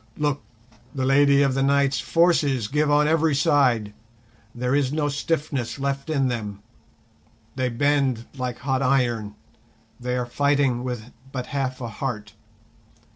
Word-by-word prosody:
"Look, 145 -2 0 0.5
the 130 -1 -1
Lady 140 +1 +5
of 135 -2 +2
the 135 - 0
Night's 140 0 +2
forces 150 -9 +2
give 150 +4 +1
on 150 +1 +4
every 160 -1 +2
side, 130 -9 +2 0.6
there 125 +2 -1
is 140 -2 +2
no 150 -1 0
stiffness 145 -4 -2
left 140 +2 -3
in 140 -4 +1
them, 105 -4 -4 0.9
they 130 -1 0
bend 130 -2 +1
like 125 -2 -3
hot 130 0 -1
iron, 120 -6 +1 0.6
they 125 0 -2
are 125 - -1
fighting 140 -1 +1
with 125 -2 -5 0.2
but 125 -2 -4
half 130 -2 -2
a 120 - -3
heart. 110 -3 -5
135 Hz, 140 wpm, -24 LUFS, 125-145 Hz, 0.9 s, Lady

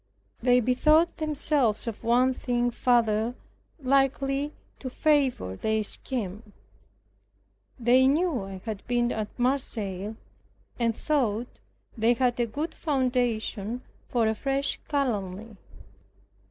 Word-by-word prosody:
They 250 0 +4
bethought 305 +8 +3
themselves 295 -7 +1
of 230 -3 -5
one 250 +3 +3
thing 245 -1 0
further 235 -1 +2 0.4
likely 275 +1 +1 0.3
to 260 - -5
favor 265 - +1
their 220 - 0
scheme. 210 -2 -5 1.3
They 250 +2 +5
knew 305 - +2
I 190 -1 -8
had 215 -3 -4
been 240 0 +1
at 215 -1 -2
Marseilles, 220 -6 -1 0.6
and 230 -1 +1
thought 245 -6 -1 0.4
they 230 +1 +3
had 245 0 +1
a 240 - +2
good 300 +9 -4
foundation 245 -5 -1 0.3
for 235 -3 +2
a 220 - +2
fresh 275 +5 -1
calumny. 220 -6 -2
245 Hz, 110 wpm, -27 LUFS, 220-270 Hz, 1.3 s, They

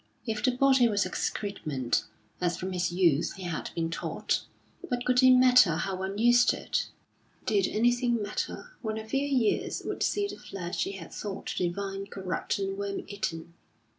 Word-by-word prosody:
If 220 -3 -2
the - - +5
body 260 -1 +4
was 205 -3 +1
excrement, 150 - -2 0.4
as 175 -1 +1
from 185 +1 -4
his 175 -1 0
youth 170 -4 +2
he 190 - -9
had 170 -3 -3
been 165 0 -1
taught, 165 - -1 0.4
what 250 -9 -3
could 250 0 +4
it 260 - +7
matter 250 -8 +6
how 185 +3 -2
one 190 +2 -4
used 240 +2 +5
it! - - -2 0.6
Did 200 -3 +2
anything 240 +1 +2
matter, 210 - -4
when 220 -2 -3
a 220 0 -6
few 270 +5 0
years 255 -6 +1
would - - -4
see 410 0 +1
the 405 - -7
flesh 180 -2 -4
he 195 - -4
had 175 -4 -9
thought 200 -2 -5
divine 195 +2 -2
corrupt 190 -3 -3
and 195 0 -3
worm 200 0 -3
eaten? 190 -5 -4
200 Hz, 170 wpm, -29 LUFS, 180-240 Hz, 0.6 s, it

